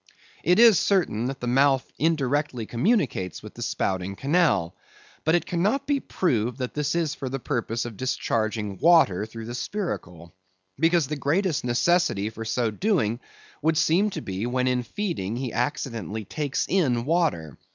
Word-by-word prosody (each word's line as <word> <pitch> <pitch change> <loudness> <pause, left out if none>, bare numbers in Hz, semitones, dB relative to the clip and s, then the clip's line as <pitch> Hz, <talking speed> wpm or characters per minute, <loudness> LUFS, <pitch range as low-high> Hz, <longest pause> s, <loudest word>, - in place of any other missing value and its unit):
It 180 +3 +4
is 230 -4 +7
certain 165 - +1
that 135 +1 -4
the - - -3
mouth 135 +2 +3
indirectly 145 -5 0
communicates 120 - 0
with - - -10
the - - -10
spouting 95 0 -2
canal; 135 - +1 0.5
but 160 +2 +3
it 175 - +1
cannot 205 +11 0
be 285 -1 +1
proved 125 - -1
that 125 -2 -4
this 150 +2 -1
is 165 -4 0
for 135 - -5
the 135 - -3
purpose 115 -2 -2
of 115 -4 -7
discharging 110 -5 -2
water 155 - +4
through 115 0 -8
the 120 - -6
spiracle. 95 - -5 0.5
Because 165 0 +3
the 150 +3 -3
greatest 160 +3 0
necessity 120 - +1
for 115 0 -7
so 115 0 0
doing 120 - 0 0.4
would 160 +1 +2
seem 170 +7 +3
to - - -5
be, 95 +4 -3
when 125 +1 0
in 125 -1 +1
feeding 125 - -3
he 125 -1 -4
accidentally 115 - -3
takes 145 +4 -2
in 135 -10 +1
water. 150 - 0
130 Hz, 160 wpm, -25 LUFS, 115-165 Hz, 0.5 s, is